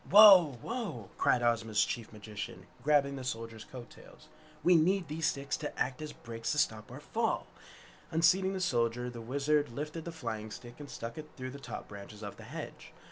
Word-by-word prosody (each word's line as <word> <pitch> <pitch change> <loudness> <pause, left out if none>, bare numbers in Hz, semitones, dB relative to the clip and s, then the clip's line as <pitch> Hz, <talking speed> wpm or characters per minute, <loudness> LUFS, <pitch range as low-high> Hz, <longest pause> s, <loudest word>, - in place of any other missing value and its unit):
"Whoa, 190 - +9
whoa!" 205 - -4
cried 120 - +3
Ozma's 115 -2 +3
chief 115 -2 -4
magician, 105 -1 -7 0.2
grabbing 140 -2 +3
the 130 - -5
Soldier's 115 -3 -4
coat 125 -2 -10
tails. - - -16 0.3
"We 180 - +6
need 175 +2 +3
these 160 +2 0
sticks 140 +1 -1
to 150 - -5
act 130 +4 0
as 155 -1 -5
brakes 115 -4 -5
to - - -3
stop 110 -6 0
our - - -7
fall!" - - -1 0.6
Unseating 185 +4 +4
the 190 - -2
Soldier, 120 -6 +1
the 120 -1 -7
Wizard 145 +4 +1
lifted 150 +6 -5
the 170 - -4
flying 110 -9 -4
stick 120 +3 -10
and 145 -1 -8
stuck 115 +4 -6
it 155 0 -8
through 130 -1 -5
the 140 - -8
top - - -7
branches 105 +1 -10
of 100 - -6
the - - -11
hedge. - - -8
135 Hz, 190 wpm, -32 LUFS, 115-155 Hz, 0.6 s, Whoa